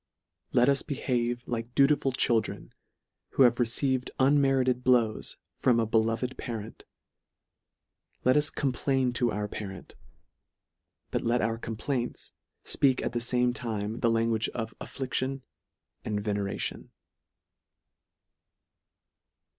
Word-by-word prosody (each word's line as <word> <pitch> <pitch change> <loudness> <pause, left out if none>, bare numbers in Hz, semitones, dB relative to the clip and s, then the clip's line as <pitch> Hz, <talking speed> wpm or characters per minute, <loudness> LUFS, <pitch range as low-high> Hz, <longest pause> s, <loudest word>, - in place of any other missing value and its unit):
Let 120 +1 +4
us 140 -1 +3
behave 120 -4 -1
like 115 0 -4
dutiful 140 -1 +4
children, 120 -3 0 0.6
who 135 - +5
have 120 -1 +4
received 125 +2 +1
unmerited 135 -2 +3
ws 120 -4 +2 0.2
from 120 -2 +3
a 115 - +2
beloved 115 +3 0
parent. 115 -3 -6 1.4
Let 130 - +4
us 150 0 +3
c 140 - -2 0.2
r - - +4
ain 130 -2 +2
to 120 0 +1
our 105 0 -2
parents; 95 -3 -7 1.2
but - - 0
let 120 0 +1
our 115 +1 -1
complaints 120 +3 -3 0.3
fpeak 130 -2 +2
at - - -1
the 120 - 0
fame 125 +1 +2
LETTER 120 - -4
III. - - -10
35 110 -2 -1
time, 105 +3 -4
the 115 - +2
language 115 -1 +1
of 110 -1 -3
affliction 130 0 -3 0.6
and 105 -1 -2
venera 100 -2 -2
tion. - - -4
120 Hz, 130 wpm, -28 LUFS, 115-130 Hz, 1.4 s, who